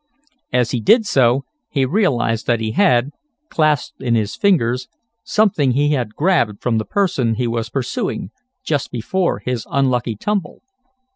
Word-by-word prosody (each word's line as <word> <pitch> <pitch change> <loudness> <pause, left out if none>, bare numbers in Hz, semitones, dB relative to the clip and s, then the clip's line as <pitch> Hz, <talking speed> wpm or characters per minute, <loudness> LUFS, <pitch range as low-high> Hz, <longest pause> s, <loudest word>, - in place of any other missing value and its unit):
As 125 -2 +1
he 125 - -1
did 220 - +4
so 135 - +2 0.2
he 135 -2 +1
realized 125 - 0
that 120 -2 +2
he 110 -1 -2
had, 130 - +3 0.4
clasped 155 -3 0
in 120 -3 +1
his 105 -2 -1
fingers, 125 -11 +1 0.4
something 180 - +2
he 145 +3 +2
had 125 -7 -1
grabbed 145 - +1
from 115 -3 0
the 110 - -3
person 170 - 0
he 125 +2 -1
was 115 -1 -2
pursuing 120 -5 -3 0.3
just 145 -3 -1
before 175 +10 -1
his 125 -3 -3
unlucky 125 -4 0
tumble. 200 - -3
125 Hz, 150 wpm, -19 LUFS, 115-155 Hz, 0.4 s, did